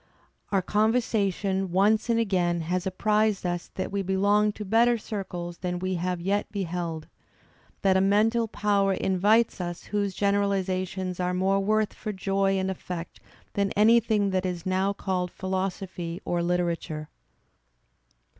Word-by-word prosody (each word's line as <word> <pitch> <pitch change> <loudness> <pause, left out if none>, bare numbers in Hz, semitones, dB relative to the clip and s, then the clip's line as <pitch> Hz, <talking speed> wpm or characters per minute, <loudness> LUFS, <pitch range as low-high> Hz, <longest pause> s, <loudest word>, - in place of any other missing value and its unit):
Our 195 -2 +2
conversation 205 -3 +1
once 210 +5 +3
and 230 0 +3
again 180 -6 +1
has 180 +3 -2
apprised 210 +1 +1
us 175 -1 -2
that 190 - -3
we 200 0 -1
belong 200 +2 +2
to 210 - -7
better 235 +4 +4
circles 180 -5 -6
than 180 -1 -2
we 185 +1 -2
have 180 0 -2
yet 200 +4 -1
beheld; 175 -5 -3 0.8
that 190 -1 +4
a 190 - +4
mental 220 +4 +3
power 200 -2 +1
invites 205 +4 +2
us 175 -1 -5
whose 200 -2 -2
generalizations 190 -2 0
are 180 0 0
more 190 +2 +2
worth 215 +2 +1
for 215 - -5
joy 195 0 0
and 190 0 0
effect 175 -2 -7 0.3
than 200 -1 +1
anything 215 -2 +4
that 185 0 0
is 180 -2 -3
now 190 +1 +1
called 185 -2 -2
philosophy 185 -2 -4
or 175 0 0
literature." 170 -3 -2
190 Hz, 140 wpm, -26 LUFS, 180-205 Hz, 0.8 s, better